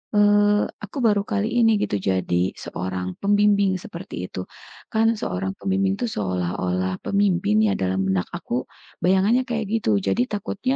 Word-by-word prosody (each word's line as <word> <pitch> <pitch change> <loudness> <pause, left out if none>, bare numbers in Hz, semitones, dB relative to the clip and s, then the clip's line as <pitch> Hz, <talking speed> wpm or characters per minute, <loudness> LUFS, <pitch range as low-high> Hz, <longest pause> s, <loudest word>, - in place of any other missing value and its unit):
eee, 205 0 +4 0.2
aku 205 +7 -8
baru 205 -2 +4
kali 210 0 -1
ini 225 - +5
gitu 100 - 0
jadi 95 -1 0
seorang 90 0 -4
pembimbing, 200 -1 +3
seperti 175 +3 -8
itu. 90 - -5 0.5
Kan 220 +1 +3
seorang 95 +1 -2
pembimbing 195 0 +1
tuh 245 - +1
seolah-olah 90 - -2
pemimpin 200 0 +2
ya - - +2
dalam 95 0 0
benak 95 -2 0
aku, - - -3 0.4
bayangannya 195 +7 +4
kayak 225 -2 -1 0.2
gitu. - - -1 0.2
Jadi 95 +6 +1
takutnya, 210 +5 -2
190 Hz, 145 wpm, -23 LUFS, -, 0.5 s, ini